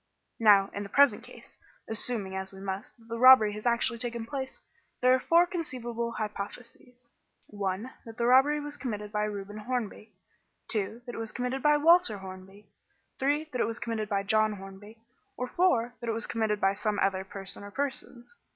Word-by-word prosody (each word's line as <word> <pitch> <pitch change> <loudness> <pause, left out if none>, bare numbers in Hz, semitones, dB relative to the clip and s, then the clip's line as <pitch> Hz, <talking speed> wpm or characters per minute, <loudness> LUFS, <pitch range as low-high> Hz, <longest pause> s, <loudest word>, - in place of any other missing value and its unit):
"Now, 205 -3 +5
in 200 - -4
the 200 - -6
present 280 -4 +4
case, - - -15 0.3
assuming, 220 -3 -3
as 190 0 -4
we 190 - -12
must, 195 +3 -5
that 230 -1 -21
the 230 0 -5
robbery 255 -5 +8
has 210 +3 -4
actually 235 0 +1
taken 235 -1 -3
place, 265 +1 -5 0.4
there 255 0 +5
are 260 - +3
four 335 +6 +4
conceivable 240 -9 -4
hypotheses: 235 +4 -7 0.4
(1) 200 +2 -3 0.2
that 225 0 -10
the 235 - 0
robbery 265 +4 +5
was 295 0 -6
committed 210 -5 -5
by 210 0 0
Reuben 205 0 -6
Hornby; 220 -2 -4 0.6
(2) 220 +2 -2
that 245 - -7
it - - -6
was 225 -1 -4
committed 250 +1 -3
by 295 +2 +4
Walter 330 - +5
Hornby; 190 +1 -11 0.5
(3) 290 +3 0
that 250 - -1
it - - +2
was 230 0 -4
committed 225 -3 -3
by 200 -2 0
John 215 +1 +2
Hornby, 195 +2 -11 0.4
or 250 - -2
(4) 245 -7 +2
that 235 - -4
it - - +1
was 225 0 -3
committed 220 -2 -1
by 195 -1 +3
some 210 +1 -1
other 190 -1 +1
person 195 +1 -7
or 205 - -8
persons. 265 - -4
225 Hz, 190 wpm, -29 LUFS, 205-250 Hz, 0.6 s, robbery